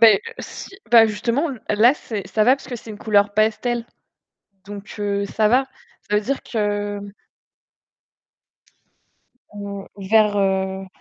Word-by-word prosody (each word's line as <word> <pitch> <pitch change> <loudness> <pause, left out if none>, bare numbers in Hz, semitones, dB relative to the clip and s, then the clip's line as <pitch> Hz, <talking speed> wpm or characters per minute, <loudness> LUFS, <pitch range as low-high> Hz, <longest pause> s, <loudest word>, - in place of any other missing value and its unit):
Bah 225 -2 +9
heu, - - +3 0.2
si, - - -8 0.2
bah, 230 -2 +8
justement, 235 +9 -1 0.2
là, 230 +6 +5
c'est, 205 -9 -6
ça 215 +2 +2
va, 260 +3 +5
parce 275 - -14
que 245 - -4
c'est 225 - -11
une 210 - -9
couleur 205 -1 +2
pastel, 230 +2 0 0.8
donc 205 0 -9
heu, 200 -1 -1
ça 215 +1 +1
va. 255 +5 +3 0.4
Ça 210 - +2
veut 210 - +3
dire 270 +6 -3
que 205 -2 -2 2.6
Mmh, 200 -1 -6 0.3
vert, 215 -2 +5
heu 190 -1 0
210 Hz, 140 wpm, -21 LUFS, 205-230 Hz, 2.6 s, Bah